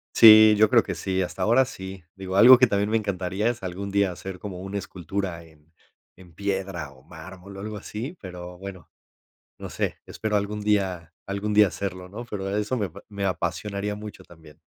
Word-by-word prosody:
Sí, 110 -1 +9
yo 110 0 +5
creo - - +5
que - - -4
sí, 95 0 -1
hasta 90 - -3
ahora 120 +4 +4
sí. 95 -7 -9
Digo, 95 -1 -6
algo 125 +6 +9
que 125 0 +5
también 100 -1 0
me 115 - +2
encantaría 100 0 -2
es 120 -2 -5
algún 95 +2 -5
día 100 -1 +2
hacer 95 +1 -8
como 95 -3 -7
una 95 +2 -5
escultura 95 -2 -5
en- 80 -1 -22 0.4
en 90 -2 -17
piedra 95 -4 -3
o 65 -1 -19
mármol 95 +1 -12
o - - -8
algo 105 +1 -5
así, 115 - -6
pero, 90 -1 -9
bueno, 95 -1 -10 0.7
no - - -8
sé, - - -2
espero 110 -1 -2
algún 105 +1 -2
día 95 -5 -1
algún 100 +2 -3
día 105 -1 +6
hacerlo, 90 0 -5
¿no? 115 +5 -7
Pero 95 -3 -4
eso 105 +4 -1
me- 100 -6 -2 0.2
me 100 -2 -5
apasionaría 100 +3 -2
mucho 105 -2 -9
también. 80 -4 -17
100 Hz, 190 wpm, -25 LUFS, 90-105 Hz, 0.7 s, Sí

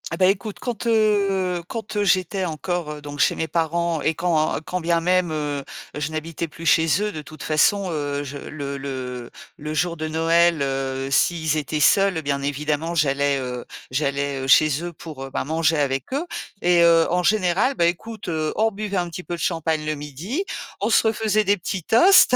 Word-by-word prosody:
Ah - - -3
bah, 185 - +4
écoute, 195 +2 0
quand, 240 -2 -4
heu, 200 -5 +2
quand, 220 -2 -6
heu, 205 - +1
j'étais 190 0 +1
encore 160 -2 -3
donc 145 0 -8
chez - - +4
mes 160 - -2
parents 165 0 0
et 160 - +1
quand 160 -2 +1
et - - -3
quand 180 0 -3
bien 170 0 +2
même, 180 0 +1
heu, 145 -2 -2 0.3
je 150 +1 -2
n'habitais 160 +1 -4
plus 165 +2 -10
chez 165 +3 +4
eux, 210 0 -1
de 155 - -5
toute 155 +1 -11
façon, 185 +5 +2
heu, 145 -2 -2
je 140 +1 -6
le 140 -1 -6
le 130 -3 -5 0.3
le 150 +1 -6
jour 170 +2 0
de 155 -1 -4
Noël, 165 0 +3
heu, 135 0 -2
s'ils 160 +1 +2
étaient 155 0 -2
seuls, 195 +2 +4
bien 140 -1 -1
évidemment, 150 +3 -2
j'allais, 140 -3 +2
heu, 125 -1 -4 0.3
j'allais, 140 0 -1
heu, 135 - -4
chez 155 +3 +4
eux, 175 - -4
pour, 145 -5 -9
ben - - -2
manger 160 +1 +1
avec 135 - -1
eux 285 +6 -1 0.4
et 175 -1 +4
heu, 165 -1 +5
en 180 +1 +1
général, 205 +6 +2
bah 170 - +2
écoute, 215 +6 -3
heu, 155 -2 -1
on 220 +1 +3
buvait 205 -1 -4
un 175 -1 0
petit 180 +2 -7
peu 175 - -4
de - - -10
champagne 160 -3 -1
le 155 0 -1
midi, 150 - -4 0.4
on 210 - +1
se 225 - +4
refaisait 215 -1 +1
des 200 +1 +4
petits 185 -1 -4
toasts. 265 - +6
165 Hz, 200 wpm, -23 LUFS, 145-185 Hz, 0.4 s, toasts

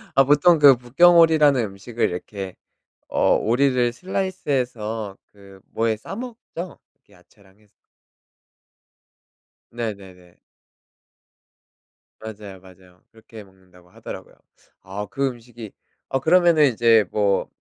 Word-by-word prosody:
아 135 - +6
보통 150 +4 +4
그 140 -2 +8
북경오리라는 155 +1 +4
음식을 105 +4 -3
이렇게 95 +1 -7 0.5
어 - - +2
오리를 125 +1 +1
슬라이스 190 +3 -5
해서 110 -6 -3 0.2
그 100 -1 -17
뭐에 115 -1 -1
싸 195 - -9
먹죠? 225 -7 -9 0.3
그 105 - -25
야채랑 95 +2 -25
해서. 105 -2 -29 2.0
네네네. 95 -6 -8 1.8
맞아요 105 -3 -10
맞아요. 90 -1 -20
그렇게 110 -1 -14
먹는다고 95 -2 -23
하더라고요. - - -10 0.5
아 100 +2 -7
그 140 0 -1
음식이 120 -3 -9 0.4
어 135 - -1
그러면은 165 0 +4
이제 115 -2 +4
뭐 100 -2 0
115 Hz, 245 characters per minute, -22 LUFS, 100-140 Hz, 2.0 s, 그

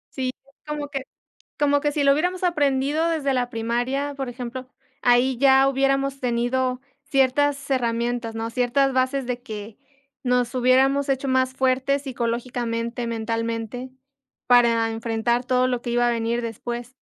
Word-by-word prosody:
Sí, 260 -1 -1
fue 275 +1 -26
como 300 -1 -3
que 275 -2 -4 0.6
como 285 -1 +3
que 295 0 0
si 290 - 0
lo 280 - +6
hubiéramos 360 +5 -1
aprendido 295 -2 +1
desde 305 -5 0
la 245 -1 0
primaria, 245 +5 -1
por 270 -1 -3
ejemplo, 250 +1 -6 0.3
ahí 245 +1 +3
ya 270 0 +5
hubiéramos 275 0 +1
tenido 250 +1 0 0.2
ciertas 280 0 +1
herramientas, 235 -2 -1
¿no?, 225 0 -3
ciertas 255 +3 +1
bases, 260 +1 +1
de 245 0 -3
que 215 -1 -8 0.5
nos 250 -1 +1
hubiéramos 265 +3 +3
hecho 270 0 0
más 260 0 +2
fuertes 265 +2 +1
psicológicamente, 235 -1 -3
mentalmente, 230 +2 -3 0.6
para 235 -2 +4
enfrentar 230 +2 -1
todo 255 0 +2
lo 250 -2 -1
que 240 - -5
iba 240 0 +2
a 240 - +2
venir 235 +1 -1
después. 240 +2 -5
255 Hz, 145 wpm, -23 LUFS, 235-275 Hz, 0.6 s, lo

